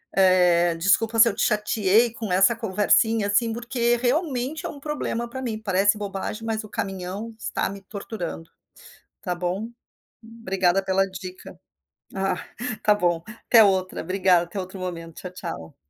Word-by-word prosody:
eh, 180 -2 +4
desculpa 215 +6 +2
se 230 - +9
eu 200 - -4
te - - 0
chateei 210 +1 +2
com 220 -4 -5
essa 195 +5 +4
conversinha 220 0 +2
assim, 225 +3 +2
porque 240 0 0
realmente 265 +2 -1
é - - -2
um 285 - -9
problema 275 -5 -3
para 260 +2 -6
mim, 230 -4 -3
parece 205 0 +2
bobagem, 205 +2 -5
mas 220 -1 -2
o 215 - -11
caminhão 195 +3 -4
está - - -2
me 195 0 -8
torturando, 190 -5 -7 0.7
tá 180 -3 -2
bom. 185 +5 -3 0.6
Obrigada 195 -5 0
pela 195 0 +2
dica. 185 0 -9 0.5
Ah, 195 -1 0 0.2
está 220 -3 +1
bom, 175 -4 0
até 225 +1 +4
outra, 190 -2 +1
obrigada, 185 0 +3
até 175 +3 -6
outro 185 +1 -7
momento, 165 -3 -6
tchau, 180 - -7
tchau. 80 - -7
200 Hz, 155 wpm, -24 LUFS, 185-230 Hz, 0.7 s, se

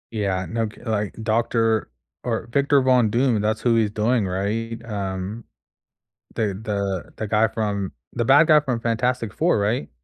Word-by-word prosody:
Yeah. 95 -4 -1
No 115 +3 -1
cu 105 - -13
like, 105 -3 -2
doctor 115 0 +1 0.3
or 115 -2 -2
Victor 140 +1 +3
Von 125 -4 +4
Doom, 120 -1 +2
that's 110 +1 0
who 120 -2 +3
he's 110 -2 +2
doing, 110 0 +1
right? 110 +5 -3
Um, 100 0 -4 0.9
the 100 -4 -1
the 100 -4 -3
the 110 - -3
guy 110 +2 +3
from 100 -3 -2 0.2
The 120 - -1
bad 145 +6 +6
guy 155 -1 +7
from 130 -5 -2
Fantastic 115 -1 -1
4, 170 +3 +2
right? 100 -6 -1
110 Hz, 160 wpm, -23 LUFS, 105-120 Hz, 0.9 s, guy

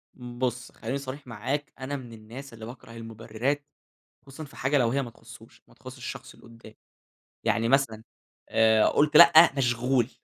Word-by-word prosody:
بُص، 125 0 -4
خليني 125 +4 -4
صريح 140 0 -8
معاك 130 +6 -4
أنا 135 +2 -4
من 120 -3 -10
الناس 115 +5 -11
اللي 110 -1 -9
باكره 120 0 -11
المبررات، 115 +5 -4 0.6
خصوصًا 140 +3 -9
في 140 - -16
حاجة 135 +3 +1
لو 120 -3 +3
هي 140 +3 0
ما 125 - -6
تخصوش، 115 0 -16
ما - - -21
تخصش - - -12
الشخص - - -8
اللي - - -19
قدامي. 115 -1 -15 0.7
يعني 115 0 +1
مثلًا 115 -5 +1 0.5
آآ، 110 -1 +4
قلت 150 +1 +3
لأ، 170 -2 +9
مشغول. 120 -1 +1
125 Hz, 165 wpm, -27 LUFS, 115-135 Hz, 0.7 s, لأ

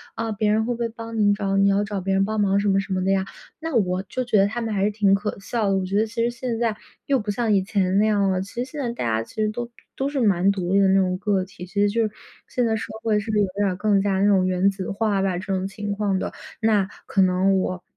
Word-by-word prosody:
啊， 225 0 -2
别 210 0 +1
人 220 +1 +2
会 245 - -1
不 235 - -8
会 230 -1 -1
帮 230 0 -7
你 205 -1 +4
找， 195 -1 -1
你 200 0 +4
要 200 +1 +2
找 205 -2 -4
别 195 +1 -1
人 195 - +3
帮 215 +1 -1
忙 200 0 +2
什 205 - 0
么 195 0 +3
什 195 - -5
么 185 0 0
的 190 - +1
呀。 195 -1 +2 0.4
那 325 -3 -4
我 185 -4 +1
就 255 +6 -3
觉 235 -3 +2
得 195 - +4
他 220 +4 -4
们 225 -2 -2
还 195 - 0
是 205 - +3
挺 205 -2 +3
可 205 +1 -1
笑 215 +1 -1
的， 195 - +2
我 190 - -1
觉 195 +2 -3
得 220 - +3
其 230 +1 -2
实 240 - +1
现 240 -1 -4
在 230 -3 0 0.3
又 275 -2 +2
不 210 -2 -6
像 215 +1 +1
以 195 - +4
前 190 -2 0
那 215 - +4
样 200 -2 +2
了， 185 - 0
其 195 - -8
实 - - -6
现 295 - -5
在 245 - -1
大 240 - -4
家 110 -1 +1
其 - - -17
实 215 -1 +1
都 240 +2 -5 0.3
都 270 +1 -1
是 285 - -2
蛮 195 -5 +3
独 185 -1 -2
立 200 - +5
的 195 - +5
那 195 +1 +4
种 185 -1 +1
个 200 -2 +1
体， 185 -2 -10
其 200 +3 -4
实 205 - +4
就 230 +3 0
是 - - -11 0.4
现 245 -1 0
在 225 - +1
社 220 - -3 0.2
会 215 -2 +2
是 215 +2 -7
不 215 - +1
是 - - +4
有 - - +1
点 205 -1 +2
儿 185 - -2
更 205 0 +2
加 195 -1 0
那 195 - +3
种 190 -2 +3
原 185 +1 +2
子 190 -1 -6
化 205 -1 0
吧 190 -2 0
这 185 - -6
种 190 0 -1
情 205 +1 -5
况 200 -1 0
的。 - - -4 0.3
那 210 -4 +3 0.2
可 195 - +1
能 190 +1 +3
我 185 -1 -3
200 Hz, 335 characters per minute, -23 LUFS, 195-220 Hz, 0.4 s, 立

